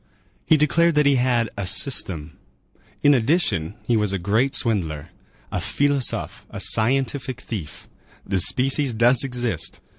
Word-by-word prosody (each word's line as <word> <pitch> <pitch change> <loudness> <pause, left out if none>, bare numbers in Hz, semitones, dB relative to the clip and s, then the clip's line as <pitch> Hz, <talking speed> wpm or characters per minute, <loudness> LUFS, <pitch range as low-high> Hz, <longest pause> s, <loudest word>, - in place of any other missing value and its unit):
He 155 - +4
declared 170 +2 +2
that 150 0 +3
he 140 -1 +3
had 120 -3 0
"a 100 -2 -4
system." 90 - 0 0.7
In 145 - +5
addition, 115 - 0
he 120 - +1
was 105 -2 0
a - - 0
great 110 +10 0
swindler. 85 -9 -1 0.4
A - - -3
filousophe - - -5 0.7
[philosophe], - - -30
a - - -8
scientific 130 +2 +1
thief. 95 -13 -8 0.4
The 95 -1 -1
species 135 - +2
does 120 +3 +4
exist. 125 - -2
120 Hz, 145 wpm, -22 LUFS, 100-135 Hz, 0.7 s, In